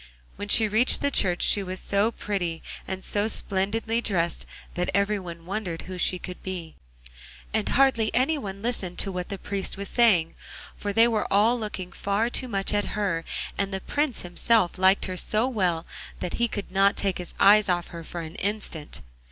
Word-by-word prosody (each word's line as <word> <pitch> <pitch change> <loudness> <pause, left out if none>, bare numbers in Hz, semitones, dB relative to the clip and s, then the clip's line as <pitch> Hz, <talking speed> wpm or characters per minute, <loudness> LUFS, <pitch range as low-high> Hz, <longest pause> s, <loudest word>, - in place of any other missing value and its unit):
When 205 - -6
she 220 +1 +7
reached 220 +5 +3
the 285 - +1
church 180 -8 +2
she 205 - +4
was 185 -1 -5
so 200 +2 +1
pretty 185 -7 -3 0.2
and 190 0 -4
so 205 +1 0
splendidly 220 +3 -1
dressed 175 -7 -1 0.3
that 180 0 -1
every 200 +1 +2
one 170 -2 -9
wondered 185 -3 -4
who 185 -1 -7
she 180 - +2
could 180 0 -8
be, 175 -4 -6 0.8
and 220 -2 +1
hardly 260 -5 +4
anyone 250 -8 0
listened 200 -7 -3
to 195 - 0
what 180 -1 -4
the 200 - -4
priest 195 0 -3
was 200 0 -4
saying, 195 -9 +3 0.4
for 205 - -3
they 225 +3 +5
were 220 -3 -1
all 215 +5 +4
looking 195 -4 -5
far 205 +5 -1
too 255 - 0
much 195 -4 0
at 205 0 +1
her, 185 -6 0 0.4
and 200 0 0
the 190 - -2
Prince 290 +5 -1
himself 185 +1 +1
liked 190 +1 +4
her 185 -1 -4
so 215 +6 +1
well 180 -9 0 0.3
that 175 - -4
he 235 - +4
could 205 -4 -5
not 195 +1 +3
take 195 -3 0
his 180 - -7
eyes 210 0 +6
off 175 -1 0
her 170 -1 -8
for 170 +1 -6
an 160 0 -7
instant. 200 -7 -3
200 Hz, 190 wpm, -26 LUFS, 180-220 Hz, 0.8 s, she